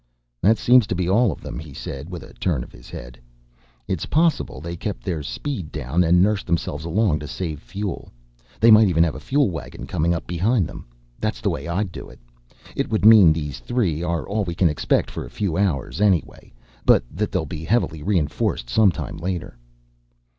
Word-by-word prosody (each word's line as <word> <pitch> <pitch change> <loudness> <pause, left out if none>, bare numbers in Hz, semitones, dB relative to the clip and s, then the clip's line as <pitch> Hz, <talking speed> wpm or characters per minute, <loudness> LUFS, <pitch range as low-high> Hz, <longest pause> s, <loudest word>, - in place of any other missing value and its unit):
"That 110 +4 +4
seems 125 -3 +5
to 90 - -2
be 90 0 -1
all 110 +3 +3
of - - -8
them," - - -6
he 75 -3 -10
said 70 +5 -7
with 90 -4 -7
a - - -14
turn 75 -10 -1
of - - -14
his - - -15
head. - - -9 0.7
"It's 95 -5 -2
possible 165 0 +1
they 85 +2 -6
kept 100 +3 -5
their 85 -5 -2
speed 95 - -5
down 75 +4 0
and 90 +1 +4
nursed 105 -1 0
themselves 80 -3 -2
along 85 -2 +1
to 75 - -7
save 80 -3 -5
fuel. 95 +9 -5 0.5
They 115 +1 +6
might 110 0 +8
even 85 -3 +3
have 85 - 0
a - - -7
fuel 140 -6 +1
waggon 80 - -7
coming 85 +2 0
up 85 - -2
behind 95 +5 +1
them. - - -9 0.3
That's 110 0 -2
the 100 - 0
way 85 - -5
I'd 90 +2 -1
do - - -9
it. 65 - -14 0.6
It - - -1
would 110 -2 0
mean 110 -7 +9
these 75 -4 -3
three 95 -11 -1
are 85 -2 -2
all 105 +1 -1
we 85 -3 -4
can 85 0 +3
expect 75 - 0
for - - -5
a - - -9
few 95 -6 -2
hours, 90 -3 -1
anyway, 95 -5 +1 0.3
but - - +5
that - - -2
they'll - - -1
be 80 - -6
heavily 80 -5 0
reinforced 75 -8 -1
some 105 - +5
time - - -6
later." 90 -6 -4
90 Hz, 205 wpm, -22 LUFS, 80-105 Hz, 0.7 s, mean